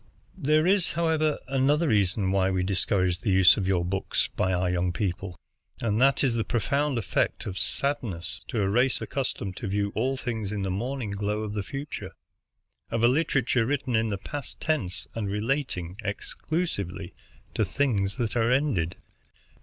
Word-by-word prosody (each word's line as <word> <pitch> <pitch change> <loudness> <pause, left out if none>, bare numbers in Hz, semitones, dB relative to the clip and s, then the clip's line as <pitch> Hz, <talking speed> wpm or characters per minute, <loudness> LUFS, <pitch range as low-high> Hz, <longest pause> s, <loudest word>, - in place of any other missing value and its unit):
"There 155 +1 +3
is, 185 -7 +2
however, 155 -2 +1
another 140 +5 +2
reason 100 -2 +2
why 95 -1 +2
we 95 -1 0
discourage 95 -1 +1
the 100 - -2
use 95 -1 +7
of 95 -3 -2
your 90 -3 +2
books 95 +2 0
by 95 - +1
our 90 0 +1
young 90 0 +1
people, 90 0 -3 0.4
and 110 0 0
that 135 +1 +4
is 130 -4 +3
the 115 -1 0
profound 135 +5 0
effect 110 - 0
of 95 -2 -4
sadness, 120 -12 -2
to 110 -4 0
a - - +2
race 125 +6 +3
accustomed 105 -8 -3
to - - -4
view 100 +1 0
all 130 +4 0
things 110 -6 -3
in 105 -2 -2
the 95 - -1
morning 120 +3 -3
glow 105 +2 -1
of 105 -1 -4
the 105 - -1
future, 135 +9 -6 0.8
of 115 0 -1
a - - +8
literature 130 -4 +2
written 130 -3 0
in 110 0 +2
the 100 - -1
past 140 +7 -7
tense 140 - -1
and 105 -3 -2
relating 105 - -2
exclusively 100 - -3 0.4
to - - +1
things 100 -2 0
that 120 -3 -1
are 115 0 +2
ended." 125 - +1
110 Hz, 170 wpm, -27 LUFS, 95-135 Hz, 0.8 s, a